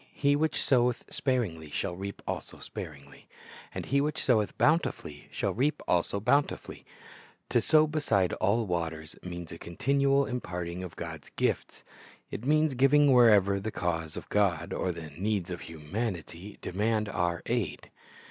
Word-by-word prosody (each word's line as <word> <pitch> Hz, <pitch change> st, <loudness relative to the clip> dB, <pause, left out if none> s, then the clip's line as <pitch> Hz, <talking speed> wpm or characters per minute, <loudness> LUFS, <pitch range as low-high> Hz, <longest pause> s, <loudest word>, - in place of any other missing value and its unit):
He 140 Hz, -1 st, +3 dB
which 155 Hz, +1 st, +1 dB
soweth 125 Hz, -2 st, +2 dB
sparingly 105 Hz, -, -1 dB
shall 90 Hz, +4 st, -2 dB
reap 100 Hz, +2 st, -6 dB
also -, -, -4 dB
sparingh; 70 Hz, -3 st, -9 dB, 0.5 s
and -, -, -5 dB
he 140 Hz, +1 st, +2 dB
which 150 Hz, +1 st, -1 dB
soweth 110 Hz, -5 st, +2 dB
bountifully 150 Hz, -, +1 dB
shall -, -, -1 dB
reap 140 Hz, +7 st, +1 dB
also 90 Hz, +3 st, +1 dB
bounti 140 Hz, +7 st, +2 dB
fully."^ -, -, -11 dB, 0.7 s
To -, -, +3 dB
sow 155 Hz, 0 st, +5 dB
beside 130 Hz, -, +1 dB
all 110 Hz, +3 st, +1 dB
waters 80 Hz, -3 st, -3 dB
means 85 Hz, -2 st, -7 dB
a 85 Hz, -, -8 dB
continual 140 Hz, +9 st, +2 dB
imparting 90 Hz, -8 st, -4 dB
of 90 Hz, -3 st, -8 dB
God's 80 Hz, -3 st, -7 dB
gifts. -, -, -1 dB, 0.5 s
It 115 Hz, -, -5 dB
means 155 Hz, 0 st, +3 dB
giving 135 Hz, +2 st, +5 dB
wherever 105 Hz, -5 st, +6 dB
the 105 Hz, +3 st, -3 dB
cause 85 Hz, -5 st, -2 dB
of -, -, -7 dB
God 90 Hz, -5 st, +1 dB
or 90 Hz, -, -1 dB
the 80 Hz, -3 st, -8 dB
needs 95 Hz, +3 st, -2 dB
of 90 Hz, -, -5 dB
humanity 85 Hz, +3 st, -5 dB
demand 105 Hz, +3 st, 0 dB
our 85 Hz, -3 st, -1 dB
aid. 115 Hz, -10 st, -2 dB
100 Hz, 150 wpm, -29 LUFS, 85-130 Hz, 0.7 s, wherever